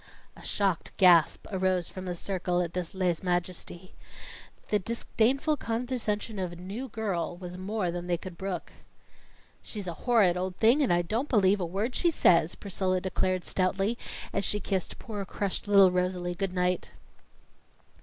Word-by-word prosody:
A - - -14
shocked 195 -5 -1
gasp 175 -4 +5
arose 185 -2 +1
from 185 0 -7
the 180 -1 -3
circle 180 -1 -1
at 170 -2 -2
this 180 -2 -3
lèse 180 -3 0
majesté. 180 0 -3 0.8
The 210 - +3
disdainful 240 - +1
condescension 225 -3 -2
of 180 -2 -2
a - - -9
new 195 +9 -6
girl 195 -6 -2
was 180 -1 -7
more 190 0 -2
than 175 0 -5
they 175 -1 +1
could 180 +1 -9
brook. 185 -1 -5 0.9
"She's 205 -3 -6
a 175 - -3 0.2
horrid 200 -7 +5
old 185 0 -2
thing, 235 +9 +4
and 265 - +2
I 175 0 +3
don't 225 +11 -2
believe 200 -3 +4
a 180 - -1
word 205 +8 -2
she 345 - +3
says!" 170 - +4
Priscilla 185 -2 0
declared 185 -1 -1
stoutly, 195 +4 +1 0.4
as 195 - 0
she 210 +2 -1
kissed 190 -2 -2
poor 210 -3 -5
crushed 195 +1 -3
little 200 -2 +7
Rosalie 180 -1 -1
goodnight. 180 0 -1
185 Hz, 160 wpm, -29 LUFS, 180-210 Hz, 0.9 s, little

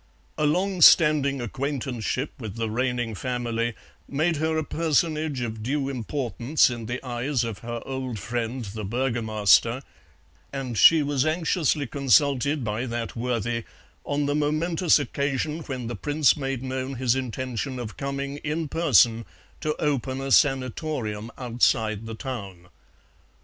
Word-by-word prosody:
A 150 - +1
long 185 +4 0
standing 150 -4 +6
acquaintanceship 130 0 -3
with 110 -5 -6
the 115 -1 -2
reigning 120 -1 -1
family 120 0 -2 0.3
made 160 +3 +1
her 160 +1 0
a 160 - 0
personage 155 -3 0
of 110 -2 -4
due 135 +4 -1
importance 130 +2 +1
in 115 -2 -6
the 125 +2 -4
eyes 125 +1 -1
of 115 -4 -4
her 120 0 -6
old 130 -3 -4
friend 120 +3 -3
the 105 +2 -6
Burgomaster, 115 +1 +2 0.7
and 135 -4 -4
she 160 +7 +7
was 140 -2 +1
anxiously 155 -2 +1
consulted 140 +1 +2
by 110 +3 -2
that 115 -1 -4
worthy 115 -1 -1 0.4
on 145 0 -1
the 145 - 0
momentous 155 +3 +2
occasion 145 +1 -2
when 130 -3 -4
the 120 +1 -4
Prince 145 +5 +2
made 135 -3 -3
known 130 +1 -3
his 125 -1 +2
intention 130 0 -3
of 120 -3 -6
coming 140 0 -4
in 155 +2 -3
person 120 - +4 0.4
to 155 -2 -1
open 135 -3 -1
a 135 0 -4
sanatorium 130 -5 +1
outside 115 -3 +1
the 115 - -5
town. 100 -9 -7
130 Hz, 140 wpm, -25 LUFS, 115-145 Hz, 0.7 s, she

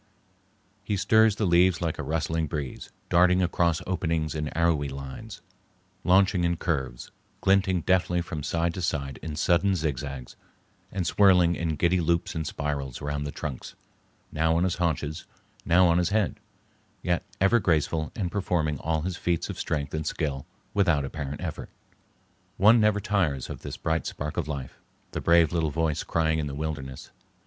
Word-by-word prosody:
He 105 0 -1
stirs 110 +1 +4
the 105 - 0
leaves 90 0 +4
like 80 -2 -2
a - - -2
rustling 80 0 -1
breeze, 70 -3 -5 0.2
darting 90 +1 +4
across 85 -2 +1
openings 80 -4 -1
in 75 -1 -3
arrowy 80 -4 +2
lines, 70 +10 -8 0.6
launching 95 0 +4
in 85 0 +1
curves, 70 -8 -3 0.3
glinting 95 -2 +2
deftly 90 0 +2
from 80 -3 -5
side 85 +3 -1
to 90 - -5
side 70 -6 -2
in 80 -2 -5
sudden 90 +5 +2
zigzags, 70 -5 -4 0.6
and 95 -3 -2
swirling 90 -2 +5
in 80 -2 -2
giddy 85 +4 +2
loops 85 +1 0
and 80 -2 -3
spirals 70 -4 -3
around 75 0 -3
the 75 - -4
trunks, 70 -5 -6 0.6
now 80 +1 +1
on 85 - +2
his 95 -2 0
haunches, 80 -3 -2 0.4
now 90 +2 +5
on 85 0 +4
his 90 0 +1
head, 105 -2 0 0.6
yet 85 0 0 0.2
ever 100 +5 +4
graceful 80 -4 0
and 90 -4 -2
performing 80 -7 -1
all 80 0 -1
his 90 0 -3
feats 85 -2 -1
of - - -8
strength 70 -2 -2
and 80 0 -2
skill 70 -5 -3 0.3
without 85 -8 +2
apparent 70 0 -5
effort. - - -5 0.9
One 110 +5 +6
never 105 -1 +3
tires 90 -11 0
of - - -8
this - - -6
bright 80 0 -1
spark 75 +1 -5
of - - -2
life, 70 -4 -6 0.3
the - - -4
brave 85 -1 +4
little 80 -2 +1
voice 80 0 0
crying 80 -1 0
in 75 - -2
the 70 - -5
wilderness. 70 -4 -5
80 Hz, 165 wpm, -27 LUFS, 75-90 Hz, 0.9 s, One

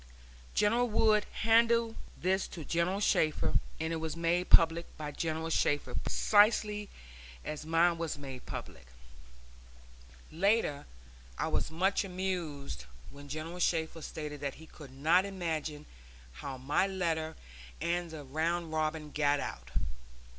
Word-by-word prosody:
General 235 +4 +3
Wood 215 -1 +3
handed 230 0 +3 0.2
this 190 +2 +1
to 165 -5 -8
General 170 +4 +1
Shafter, 155 -6 +2 0.2
and 160 +1 -1
it - - -1
was 160 -1 -3
made 170 +2 +1
public 165 0 +5
by 150 -1 -4
General 160 +2 -2
Shafter 145 -5 +1
precisely 210 - +3 0.6
as 155 0 -5
mine 165 +1 +3
was 165 -3 -2
made 135 -3 -8
public.[*] - - -7 1.4
Later 190 -4 +1 0.5
I - - 0
was - - 0
much 185 +7 +1
amused 180 - -3 0.3
when 145 0 -12
General 160 +4 -5
Shafter 165 -1 0
stated 150 -1 -6
that 140 -1 -3
he 160 - -12
could 150 -3 -12
not 160 +7 +4
imagine 160 -6 -3 0.5
how 130 - -6
my 145 +9 +1
letter 165 -4 -1 0.4
and 170 +1 -1
the 155 -2 -7
round 160 +4 -1
robin 155 -1 -1
got 145 -1 +2
out! 65 - -5
165 Hz, 130 wpm, -32 LUFS, 150-185 Hz, 1.4 s, public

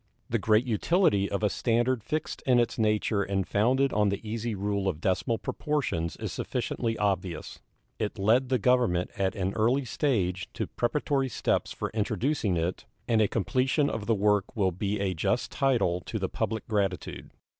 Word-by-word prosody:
The - - +2
great 110 +2 +3
utility 115 - +2
of 100 +1 -2
a 105 - +4
standard 120 0 +1
fixed 155 +6 -3
in 125 -2 +5
its 120 -1 0
nature 105 -1 +1
and 95 -1 -1
founded 130 +6 +2
on 105 -1 +3
the 100 +2 -4
easy 115 0 -2
rule 100 0 -1
of 90 -5 -1
decimal 95 +6 0
proportions 125 - -2
is - - -5
sufficiently 115 -1 -2
obvious. 95 -4 -2 0.4
It 110 +1 -2
led 115 +6 +3
the 130 - +3
Government 120 -7 +2
at 95 -1 0
an 95 0 -1
early 125 +5 +2
stage 100 - 0
to - - -2
preparatory 135 +1 0
steps - - 0
for - - -4
introducing 110 - 0
it, 85 +2 -2 0.2
and 115 -2 +3
a 105 - +4
completion 130 - +1
of 105 - -4
the 115 - +3
work 105 +2 +1
will 95 -4 +2
be 100 +4 -2
a 95 -2 0
just 80 - -1
title 110 -10 +1
to 110 - -3
the 95 -3 -2
public 110 0 -3
gratitude. 100 -5 -2
110 Hz, 175 wpm, -28 LUFS, 95-120 Hz, 0.4 s, in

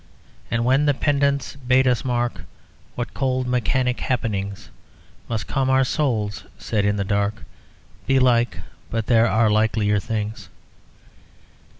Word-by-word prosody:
And 115 0 0
when 135 +4 +3
the 145 - +3
pedants 140 0 0
bade 130 0 +2
us 125 -2 +2
mark 120 -6 -1 0.5
What 120 0 -4
cold 130 -1 -1
mechanic 125 0 0
happenings 100 -6 -3 0.6
Must 115 -2 -2
come; 135 -1 -1
our 130 0 +4
souls 120 - -1
said 105 -2 -1
in 105 0 +2
the 100 - -1
dark, 100 +1 -1 0.6
"Belike; 125 -3 +3 0.3
but 115 -1 -2
there 115 0 +4
are 110 +3 +3
likelier 105 -1 +2
things." 105 -1 -4
120 Hz, 125 wpm, -22 LUFS, 105-130 Hz, 0.6 s, our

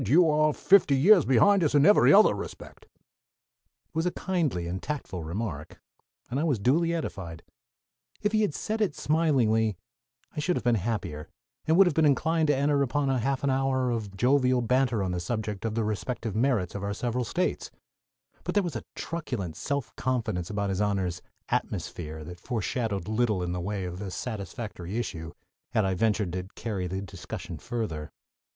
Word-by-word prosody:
you 165 - +6
are 155 0 +3
fifty 170 -2 +4
years 180 +3 +6
behind 185 - +5
us 150 -2 +1
in 145 0 +6
every 210 - +7
other 205 - +7
respect!_" 100 - -8
It - - -34 1.0
was 160 +2 0
a - - +1
kindly 160 - -1
and 90 +2 -4
tactful 115 - -4
remark, 80 -2 -5 0.5
and 130 +3 -2
I - - 0
was 150 -7 +2
duly 150 +11 +2
edified. 95 - -4 0.8
If 210 - +2
he 215 0 +2
had 205 -9 0
said 220 +1 -2
it 195 -8 +1
smilingly, 120 - +2 0.6
I - - -3
should 175 +4 +1
have - - -2
been 120 -1 +3
happier, 95 -8 -3 0.4
and 160 +2 +4
would 195 - +8
have 175 - +2
been 155 0 +4
inclined 160 +3 +2
to 145 - +3
enter 140 +1 +2
upon 140 +1 +1
a 130 - +1
half 135 +3 -1
hour 130 -1 +1
of 105 -5 -4
jovial 130 +1 +3
banter 125 -3 +2
on 95 - -1
the 90 - -2
subject 105 +2 -3
of 110 -1 -2
the 115 - +1
respective 110 +1 -3
merits 115 -7 +1
of 100 - -5
our 100 0 -2
several 125 +2 -1
States; 175 +10 -1 0.7
but - - -3
there 205 - +4
was 170 -7 -4
a 115 - -5
truculent 125 - -4
self 140 -2 -3
confidence 115 -9 -1
about 100 -1 -1
his 95 +1 -1
honor's 95 -4 -1 0.3
"atmosphere" 80 -2 -3
that 90 +3 -9
foreshadowed 110 -3 -2
little 110 -4 +1
in 90 - -2
the 90 0 -3
way 100 +1 -3
of 90 +2 -6
a 100 - -4
satisfactory 105 -2 -5
issue 80 -8 -4 0.4
had 110 -4 +2
I 95 - +1
ventured 105 -2 0
to 95 0 -4
carry 100 -6 -3
the 95 +2 -4
discussion 95 - -7
further. 105 -11 -4
115 Hz, 185 wpm, -27 LUFS, 95-145 Hz, 1.0 s, would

